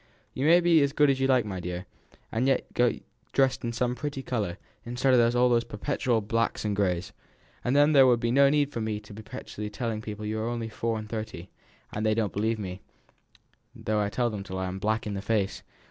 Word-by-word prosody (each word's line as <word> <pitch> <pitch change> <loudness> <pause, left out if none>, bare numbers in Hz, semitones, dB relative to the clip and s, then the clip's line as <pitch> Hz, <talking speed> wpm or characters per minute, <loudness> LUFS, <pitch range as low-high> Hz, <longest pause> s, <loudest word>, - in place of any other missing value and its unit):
"You 135 +3 0
may 170 +2 +7
be 170 -2 +5
as 140 0 +1
good 145 -1 +4
as 135 - -1
you 135 - +2
like, 130 -4 +3
my 95 -3 -4
dear, 90 +1 -5 0.5
and 120 +4 0
yet 135 - 0
go 120 -1 +3 0.4
dressed 135 -1 +2
in 120 - -1
some 125 +1 0
pretty 140 0 -4
colour, 105 -9 -2 0.3
instead 125 +2 +1
of 125 - +6
those 120 -1 +3
perpetual 120 +1 -1
blacks 115 +1 -1
and 105 -1 0
greys, 90 -3 -1 0.5
and 125 - +1
then 145 +1 +5
there 135 -3 +7
would 120 -2 +4
be 115 0 0
no 140 +2 +6
need 145 0 +2
for 115 - -4
me 110 -1 -2
to 105 0 -13
be 110 - -8
perpetually 105 0 -7
telling 110 0 -3
people 105 -1 -6
you 110 +1 -2
are 110 +2 -1
only 115 -2 -3
four 115 0 -2
and 110 0 -6
thirty 105 -5 -6 0.4
(and 105 - -2
they 110 -1 +2
don't 110 -3 0
believe 110 +2 0
me, 95 -3 -6 0.9
though 110 0 -1
I 100 - 0
tell 120 +2 0
them 105 - -4
so 100 - -8
till - - -2
I 95 - -2
am 95 +1 -4
black 110 +4 0
in 105 - -3
the 100 - -3
face). 105 -2 -1
115 Hz, 235 wpm, -27 LUFS, 105-130 Hz, 0.9 s, may